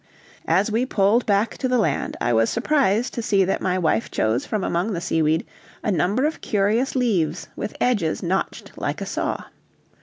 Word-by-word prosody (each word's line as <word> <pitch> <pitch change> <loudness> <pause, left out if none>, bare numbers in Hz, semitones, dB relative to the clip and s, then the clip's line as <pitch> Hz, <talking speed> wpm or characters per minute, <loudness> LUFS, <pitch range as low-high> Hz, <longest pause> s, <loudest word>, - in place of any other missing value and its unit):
As 205 +3 +2
we 230 +3 +1
pulled 220 -1 +2
back 210 +2 +1
to 260 - 0
the 255 0 +2
land 220 - 0
I 120 - +1
was 115 0 +3
surprised 245 -3 +1
to 235 - -3
see 200 -4 +2
that 195 - -1
my 185 -1 0
wife 160 -11 +1
chose 110 +4 0
from 210 -3 -1
among 180 +6 0
the 170 - -2
seaweed 160 -1 +1 0.4
a 210 - +1
number 195 - +1
of 315 - -2
curious 215 +7 +1
leaves 215 -11 0
with 210 - -5
edges 200 -12 +1
notched 185 +2 -2
like - - -2
a - - -2
saw. - - -2
200 Hz, 185 wpm, -23 LUFS, 175-235 Hz, 0.4 s, was